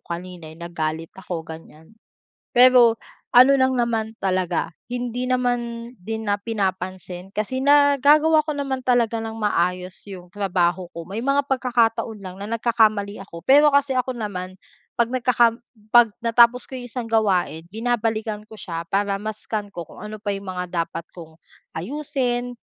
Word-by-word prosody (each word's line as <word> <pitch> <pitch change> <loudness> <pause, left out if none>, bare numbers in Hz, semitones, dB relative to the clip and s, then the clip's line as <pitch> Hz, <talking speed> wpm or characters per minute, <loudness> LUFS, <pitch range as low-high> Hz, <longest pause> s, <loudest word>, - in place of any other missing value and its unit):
kanina 175 -1 -7
yong 165 +2 -10
nagalit 160 -1 -4
ako 175 -3 -6
ganyan. 160 +3 -12 0.6
Pero 245 -2 +6 0.3
ano 255 +3 +8
lang 260 0 +3
naman 230 -3 0
talaga 185 -3 0 0.2
hindi 245 0 -3
naman 240 -2 -1
din 220 +3 -5
na 205 - +2
pinapansin 190 -3 -4
kasi 215 +5 -2
nagagawa 290 +2 +5
ko 305 - -1
naman 270 -2 -3
talaga 240 -3 +2
ng 225 0 -5
maayos 180 -2 0
yong 185 -3 -10
trabaho 185 -2 0
ko. 170 0 -8
May 215 +5 -4
mga 275 +1 +2
pagkakataon 235 -4 0
lang 185 -1 -8
na 200 - -6
nagkakamali 215 -3 +2
ako, 170 - -10
pero 290 +2 +6
kasi 280 -2 +2
ako 255 0 0
naman 185 -5 -5 0.4
'pag 235 0 +1
nagkaka 250 -1 +3 0.4
'pag 235 -3 +6
natapos 235 +1 +4
ko 260 - -5
yung 245 - -8
isang 240 -1 -6
gawain 185 -7 +1
binabalikan 220 0 -2
ko 220 - -13
siya 170 -5 -6
para 200 +2 0
ma-scan 215 0 -4
ko 175 - -4
kung 165 - -15
ano 210 0 -8
pa 205 - -2
yung 200 0 -4
mga 180 -2 -2
dapat 165 - -7
kong 160 -2 -12 0.4
ayusin 245 - -2
220 Hz, 155 wpm, -22 LUFS, 185-245 Hz, 0.6 s, ano